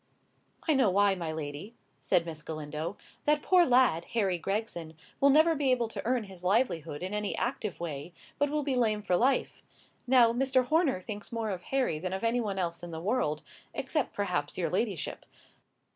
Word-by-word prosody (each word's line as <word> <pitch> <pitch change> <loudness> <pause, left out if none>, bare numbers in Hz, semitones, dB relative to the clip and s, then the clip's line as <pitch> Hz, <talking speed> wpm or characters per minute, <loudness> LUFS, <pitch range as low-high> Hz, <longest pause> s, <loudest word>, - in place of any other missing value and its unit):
"I 315 - +5
know 265 -7 +4
why, 200 +1 +4
my 170 -4 -3
lady," 155 +8 -6 0.2
said 170 - +2
Miss 160 -2 -6
Galindo. 155 +3 -5 0.3
"That 300 0 +2
poor 360 -2 +5
lad, 245 -10 +4
Harry 195 -6 +1
Gregson, 175 -5 -3 0.2
will 280 - +5
never 315 +4 +6
be 290 -3 0
able 245 -2 +2
to - - -6
earn 245 -1 +1
his 190 -3 -12
livelihood 180 - 0
in 190 +2 -4
any 210 -1 -2
active 230 -6 -2
way, 160 -1 -5 0.3
but 290 0 +2
will 300 0 -1
be 275 -1 -1
lame 220 -4 +1
for 185 -3 +2
life. 260 +8 +1 0.5
Now, 240 -2 +6
Mr. 260 0 +2
Horner 300 - +2
thinks 205 +1 -7
more 225 -2 -2
of 185 -2 -4
Harry 260 -13 0
than 185 +2 -3
of 190 - -4
any 235 +2 +2
one 200 -4 -3
else 170 -2 -2
in 175 - -7
the 160 -1 -5
world,—except, 180 -5 -2
perhaps, - - -2
your - - -1
ladyship." - - -2
210 Hz, 185 wpm, -30 LUFS, 170-255 Hz, 0.5 s, never